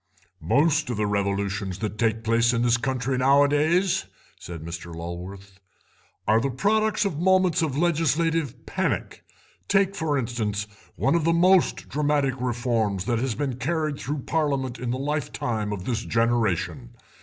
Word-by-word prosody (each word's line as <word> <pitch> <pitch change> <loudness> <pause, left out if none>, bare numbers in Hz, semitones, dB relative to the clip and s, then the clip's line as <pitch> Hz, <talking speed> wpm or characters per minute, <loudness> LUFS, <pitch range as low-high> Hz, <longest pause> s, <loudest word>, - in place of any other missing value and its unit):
"Most 145 - +2
of 120 - -2
the 105 - +1
revolutions 100 -2 -1
that 105 0 -4
take 115 -1 +1
place 115 +1 +3
in 115 0 +1
this 120 -1 +4
country 130 +1 -1
nowadays," 145 +7 +3 0.3
said 85 -2 -8
Sir 85 0 -7
Lulworth, 90 +3 -8 0.7
"are 110 +2 +4
the 140 - 0
product 215 - +1
of 165 -7 -2
moments 185 -1 +3
of 145 -4 -1
legislative 165 -4 0
panic. - - -2 0.4
Take, 195 -1 +3
for 155 -5 0
instance, 110 -4 -2 0.3
one 135 - +1
of 170 -2 +2
the 165 +1 +3
most 180 +1 +3
dramatic 145 -1 +1
reforms 115 -6 -1
that 120 0 0
has 125 -2 -1
been 135 0 -2
carried 155 +1 -1
through 145 -1 -4
Parliament 140 -6 -1
in 125 0 -3
the 125 - -1
lifetime 125 -6 -2
of 100 -3 -5
this 115 -3 -2
generation. 95 - 0
125 Hz, 150 wpm, -25 LUFS, 105-150 Hz, 0.7 s, this